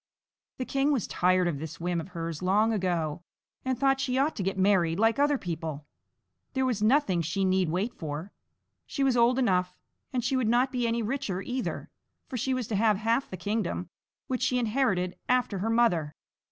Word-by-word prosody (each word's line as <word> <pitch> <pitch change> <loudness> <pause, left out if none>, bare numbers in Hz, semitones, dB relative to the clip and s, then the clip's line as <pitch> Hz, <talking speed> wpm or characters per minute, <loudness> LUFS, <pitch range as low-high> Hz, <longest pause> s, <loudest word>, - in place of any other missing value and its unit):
The 255 - -3
king 275 +3 +1
was 260 -8 +1
tired 180 0 +2
of 150 -5 -2
this 160 +1 -7
whim 175 0 -1
of 160 - -9
hers 165 -3 -5
long 210 +5 +3
ago, 175 -6 -1 0.4
and 260 -1 -1
thought 270 +1 +2
she 255 -1 0
ought 285 +4 +1
to - - -2
get 195 +1 -1
married 185 -4 +3
like 225 +3 +3
other 290 0 +3
people; 160 - -5 0.7
there 265 -1 +1
was 240 -5 0
nothing 215 - +3
she 170 +4 -1
need 185 -2 +2
wait 190 +8 -1
for 155 +4 -6 0.6
she 275 - -1
was 265 -2 +3
old 240 +1 +4
enough 180 -7 +1 0.4
and 250 -2 -1
she 260 +2 0
would 250 -4 +1
not 250 +3 +3
be 245 -2 0
any 230 0 0
richer 215 -6 -2
either, 255 0 -4 0.3
for 265 - -7
she 265 +2 -1
was 255 -2 0
to 220 - -1
have 210 0 +3
half 230 +5 0
the 185 - -6
kingdom, 200 - -2 0.4
which 255 -1 -2
she 250 - +2
inherited 215 -7 0
after 250 -6 +1
her 215 +4 -1
mother. 180 -11 +2
215 Hz, 195 wpm, -28 LUFS, 180-255 Hz, 0.7 s, old